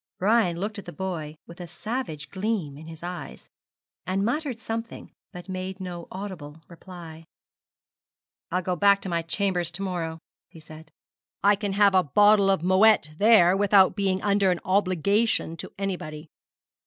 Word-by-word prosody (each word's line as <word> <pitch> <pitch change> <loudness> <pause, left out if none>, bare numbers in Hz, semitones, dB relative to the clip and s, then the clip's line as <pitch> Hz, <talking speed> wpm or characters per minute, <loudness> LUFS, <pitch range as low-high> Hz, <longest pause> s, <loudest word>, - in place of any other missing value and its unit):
Brian 195 -4 +2
looked 205 +2 -4
at - - -11
the 175 - -7
boy 170 -5 -5
with 170 +1 -12
a 175 - -7
savage 175 - -5
gleam 190 -7 -2
in 155 +2 -12
his 165 0 -11
eyes, 180 0 -7 0.6
and 195 +2 -1
muttered 260 0 -2
something, 225 +1 -6 0.2
but 180 +1 -10
made 185 0 -5
no 175 -2 -7
audible 180 -6 -8
reply. 170 -2 -11 1.3
'I'll 180 +1 -1
go 180 0 -1
back 200 +2 +4
to 190 - -5
my 170 -1 0
chambers 175 0 0
to 175 +3 -6
morrow,' 170 -4 -3 0.3
he 165 - -14
said: 155 0 -13 0.5
'I 205 +1 +5
can 200 -1 -3
have 200 0 +4
a 185 - +5
bottle 205 +5 +4
of 195 -4 +2
Moët 185 -3 +4
there 200 -4 +6
without 195 -1 +4
being 190 -2 -1
under 200 -1 +2
an 180 -1 0
obligation 195 0 +1
to - - -7
anybody. 165 -6 -5
185 Hz, 160 wpm, -25 LUFS, 170-200 Hz, 1.3 s, there